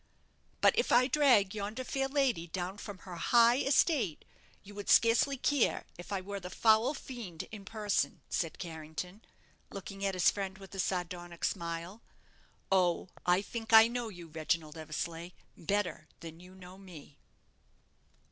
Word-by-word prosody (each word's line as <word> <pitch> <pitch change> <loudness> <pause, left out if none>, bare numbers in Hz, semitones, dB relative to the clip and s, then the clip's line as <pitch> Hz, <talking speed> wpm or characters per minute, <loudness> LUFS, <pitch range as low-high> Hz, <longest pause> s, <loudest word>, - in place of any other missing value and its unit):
"But - - +5
if 475 - 0
I 245 +1 +6
drag 255 -8 +4
yonder 215 +4 -4
fair 270 +1 -1
lady 265 - 0
down 185 +3 -4
from 205 -2 -8
her 180 -2 -7
high, 235 +6 +4
estate, 270 - +2 0.4
you 205 - -12
would 205 0 -7
scarcely 235 +4 +4
care 275 -1 +1
if 175 - -11
I 195 -2 -1
were 200 +1 -6
the 180 -1 -8
foul 220 +8 +3
fiend 225 -13 -7
in 210 -3 -9
person," 210 -1 -1
said 165 -3 -2
Carrington, 165 +4 -7 0.5
looking 195 +1 -8
at 195 -1 0
his 180 - +4
friend 195 -2 -5
with 195 0 -13
a 195 - -7
sardonic 175 -2 -3
smile. 170 +5 -4 0.7
"Oh, 180 -1 +2 0.2
I 180 +2 +4
think 225 +1 -5
I 220 0 +10
know 240 -1 -3
you, 175 -4 -11
Reginald 155 0 -2
Eversleigh, 165 +2 -5 0.2
better 205 +2 -2
than 165 0 -9
you 180 +1 -14
know 185 0 -13
me." 170 -7 -13
195 Hz, 155 wpm, -32 LUFS, 175-225 Hz, 0.7 s, I